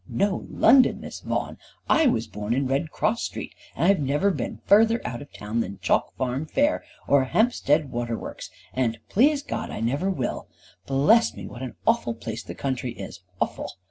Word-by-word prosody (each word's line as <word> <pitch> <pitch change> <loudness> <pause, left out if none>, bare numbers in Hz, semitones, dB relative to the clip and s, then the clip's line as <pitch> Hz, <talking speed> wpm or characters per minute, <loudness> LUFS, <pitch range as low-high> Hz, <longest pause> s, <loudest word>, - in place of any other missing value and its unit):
"Know 200 0 0
London, 265 -2 +5
Miss - - -8
Vaughan! - - -3 0.3
I 320 - +4
was 115 - +1
born 105 +2 -3
in 135 +1 +1
Red 135 +5 0
Cross 225 +7 0
Street, - - -5 0.2
and - - 0
I've 195 -1 +4
never 145 +8 +2
been 135 -10 -4
further 225 +3 +5
out 120 +1 -4
of 145 - -12
town 105 +3 -4
than 100 -4 -3
Chalk - - +1
Farm 130 +4 -2
fair, 290 - +1 0.2
or 140 -2 +4
Hampstead 150 - +2
Waterworks, 120 -1 -4 0.2
and, 120 -3 0
please 280 +6 +3
God, - - -4
I - - -5
never 140 - 0
will. 135 -10 -3 0.4
Bless 150 - +4
me, - - -7
what 120 - -9
an 130 -2 -6
awful 225 - +2
place 115 0 -5
the - - -8
country 130 -3 -3
is, 100 - -9 0.2
awful! - - -2
140 Hz, 180 wpm, -25 LUFS, -, 0.4 s, London